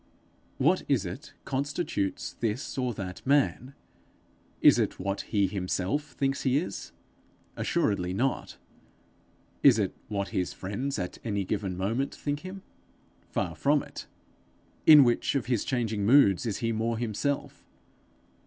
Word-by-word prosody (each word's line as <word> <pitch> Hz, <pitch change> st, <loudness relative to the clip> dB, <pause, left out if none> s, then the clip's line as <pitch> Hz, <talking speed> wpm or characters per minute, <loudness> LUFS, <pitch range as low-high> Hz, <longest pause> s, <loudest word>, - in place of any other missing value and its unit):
What 170 Hz, +8 st, +3 dB
is 130 Hz, -8 st, +2 dB
it 140 Hz, +11 st, -8 dB
constitutes 140 Hz, -, -2 dB
this 115 Hz, +4 st, -3 dB
or 125 Hz, -2 st, 0 dB
that 90 Hz, -3 st, -6 dB
man? 140 Hz, -1 st, +1 dB, 0.8 s
Is -, -, +6 dB
it -, -, 0 dB
what 100 Hz, +1 st, -2 dB
he 100 Hz, -2 st, +2 dB
himself 95 Hz, +9 st, -2 dB
thinks 135 Hz, 0 st, -1 dB
he 130 Hz, 0 st, +2 dB
is? 160 Hz, -, -4 dB, 0.6 s
Assuredly 90 Hz, -3 st, 0 dB
not. 125 Hz, +8 st, -1 dB, 1.0 s
Is 130 Hz, -5 st, +7 dB
it 100 Hz, -4 st, 0 dB
what 100 Hz, -3 st, -2 dB
his 90 Hz, 0 st, -2 dB
friends 125 Hz, +9 st, -3 dB
at 90 Hz, -, -4 dB
any 100 Hz, -4 st, -1 dB
given 95 Hz, -2 st, -2 dB
moment 115 Hz, +9 st, -1 dB
think 145 Hz, 0 st, -3 dB
him? 185 Hz, +4 st, -9 dB, 0.7 s
Far -, -, -2 dB
from -, -, +2 dB
it. -, -, -9 dB, 0.8 s
In 150 Hz, -2 st, +10 dB
which 120 Hz, +3 st, +1 dB
of 135 Hz, -, 0 dB
his 120 Hz, -3 st, 0 dB
changing 110 Hz, -5 st, -1 dB
moods 110 Hz, -4 st, +5 dB
is 105 Hz, -, -1 dB
he 115 Hz, -, +1 dB
more 115 Hz, +1 st, -1 dB
himself? 120 Hz, +5 st, -2 dB
115 Hz, 135 wpm, -28 LUFS, 100-140 Hz, 1.0 s, In